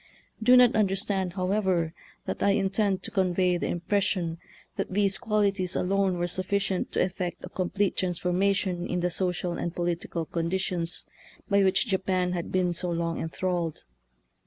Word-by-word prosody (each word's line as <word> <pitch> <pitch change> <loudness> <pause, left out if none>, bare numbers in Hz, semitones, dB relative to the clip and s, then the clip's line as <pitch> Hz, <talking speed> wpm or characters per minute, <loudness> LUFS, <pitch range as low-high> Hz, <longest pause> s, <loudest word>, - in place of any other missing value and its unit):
Do 250 +3 +7
not 250 0 +6
understand, 195 -3 +1
however, 185 -3 0 0.3
that - - -4
I 200 - +4
intend 195 -1 +1
to - - -4
convey 180 -1 +2
the - - -2
impression 175 -2 -1 0.4
that - - -2
these 200 0 +2
quali 210 -3 +2
ties 185 -2 -2
alone 190 0 +1
were 175 - 0
sufficient 190 +1 -1
to - - +3
effect 180 -1 -4
a - - -9
com 185 -1 -2
plete 200 +1 0
transformation 180 0 0
in 180 0 -1
the 180 0 0
social 180 -1 -1
and 170 - -3
political 170 -1 -2
conditions 170 +1 -1 0.4
by 200 -1 +3
which 190 +5 +3
Japan 190 -3 0
had 175 -2 -3
been 180 -1 +1
so 180 +1 -2
long 170 -1 -1
enthralled. 170 -1 -2
185 Hz, 160 wpm, -27 LUFS, 175-195 Hz, 0.4 s, Do